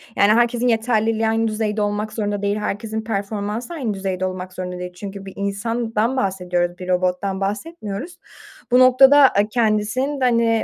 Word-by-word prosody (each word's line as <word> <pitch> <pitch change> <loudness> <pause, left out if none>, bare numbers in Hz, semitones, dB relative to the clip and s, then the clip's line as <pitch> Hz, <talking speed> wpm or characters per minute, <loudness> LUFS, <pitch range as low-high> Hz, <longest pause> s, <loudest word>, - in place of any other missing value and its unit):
Yani 200 +1 +4
herkesin 240 +1 +2
yeterliliği 225 -1 +1
aynı 225 +1 +1
düzeyde 215 -1 -1
olmak 210 +1 -2
zorunda 205 -2 -2
değil. 205 +1 0
Herkesin 215 +1 -3
performansı 210 +4 -3
aynı 255 -10 -2
düzeyde 190 -1 -3
olmak 185 0 -5
zorunda 180 -1 -5
değil. 180 0 -6
Çünkü 195 +1 -8
bir 195 - -9
insandan 225 +4 -1
bahsediyoruz, 180 -4 -1
bir 180 - -8
robottan 185 +2 0
bahsetmiyoruz. 215 - -5 0.5
Bu 250 - +6
noktada, 265 +2 +7
ııı, 205 - +3
kendisinin 230 +5 0
de, - - +3
hani, 230 -2 +2
215 Hz, 160 wpm, -21 LUFS, 195-230 Hz, 0.5 s, noktada